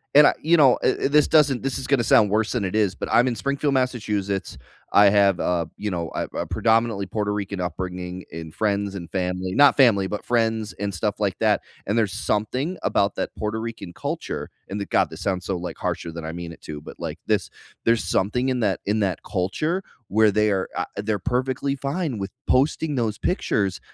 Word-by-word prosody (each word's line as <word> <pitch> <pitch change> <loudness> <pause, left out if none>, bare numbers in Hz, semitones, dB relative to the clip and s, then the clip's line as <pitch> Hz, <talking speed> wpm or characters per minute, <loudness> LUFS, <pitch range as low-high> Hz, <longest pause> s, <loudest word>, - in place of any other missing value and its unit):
and 150 0 +9
I - - +4
you 165 +3 +4
know, 135 -5 +6
eh, - - +1
eh, - - +1
this 150 0 +4
doesn't, 145 -5 +4
this 135 -1 -2
is 130 - -5
gonna 130 -5 +2
sound 105 -2 +5
worse 110 +2 +1
than 120 -5 0
it 95 - -2
is, 105 -4 +2
but - - -5
I'm 120 +2 +5
in 120 - 0
Springfield, 140 +2 -1
Massachusetts. 105 -7 -1 0.4
I 100 -1 +7
have, 100 -2 +4
uh, 85 -2 0
you 105 -1 -3
know, 85 -3 -3
a, - - 0
a - - -1
predominantly 110 -3 +1
Puerto 105 +2 -2
Rican 100 -2 -4
upringing 90 +1 -4
in 80 -1 -7
friends 100 -2 -1
and 85 -3 -7
family, 90 0 -2
not 145 +3 +6
family, 105 -8 +5
but 105 - -5
friends 115 -2 0
and 100 0 -1
stuff, 85 - -2
like, - - 0
that, - - +3 0.2
and 105 +4 0
there's 105 -5 +1
something 120 - -1
about 100 0 +1
that - - -3
Puerto 110 +1 -2
Rican 110 -6 -6
culture, - - -4 0.2
and 100 +1 -3
the 100 - -3
God - - +2
this - - -10
sounds 90 -2 -1
so, 95 -2 -1
like, 85 -1 -6
harsher 85 -1 -3
than 85 -1 -6
I 80 - -4
mean 85 0 -6
it - - -16
to, 75 -1 -7
but, - - -11
like, - - -5
this, - - +1 0.3
there's 115 0 +2
something 105 +7 0
in 125 -2 0
that 100 -3 +1
in 105 +1 +1
that 95 -3 -1
culture 155 - -1 0.2
where 110 +1 +4
they 105 +1 +2
are, 95 -2 0
uh, - - 0
they're 105 0 -1
perfectly 130 +5 -1
fine 140 - -2
with 95 0 -4 0.2
posting 145 +2 +2
those 110 -4 -1
pictures, 100 - 0
105 Hz, 215 wpm, -23 LUFS, 95-125 Hz, 0.4 s, and